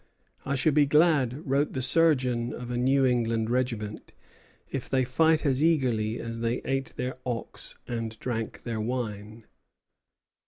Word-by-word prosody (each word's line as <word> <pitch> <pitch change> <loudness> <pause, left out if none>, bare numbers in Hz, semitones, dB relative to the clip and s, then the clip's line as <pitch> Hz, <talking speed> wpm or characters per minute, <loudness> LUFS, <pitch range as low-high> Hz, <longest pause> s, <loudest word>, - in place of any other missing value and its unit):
"I 140 - 0
shall 145 +3 +2
be 145 0 +4
glad," 150 -3 +3
wrote 140 +2 +1
the 130 - -2
surgeon 125 -6 +3
of 120 0 -6
a - - -2
New 135 +2 +3
England 115 -2 +1
regiment, 115 -4 -2 0.6
"if 135 -2 -4
they 130 -1 +2
fight 160 +5 +2
as 135 0 +2
eagerly 120 -9 +1
as 115 0 -5
they 115 +1 0
ate 135 -1 -2
their 125 +1 -3
ox 120 -2 -5
and 115 -2 -4
drank 115 -2 -4
their 115 -2 -3
wine." 110 -2 -4
125 Hz, 150 wpm, -27 LUFS, 115-135 Hz, 0.6 s, be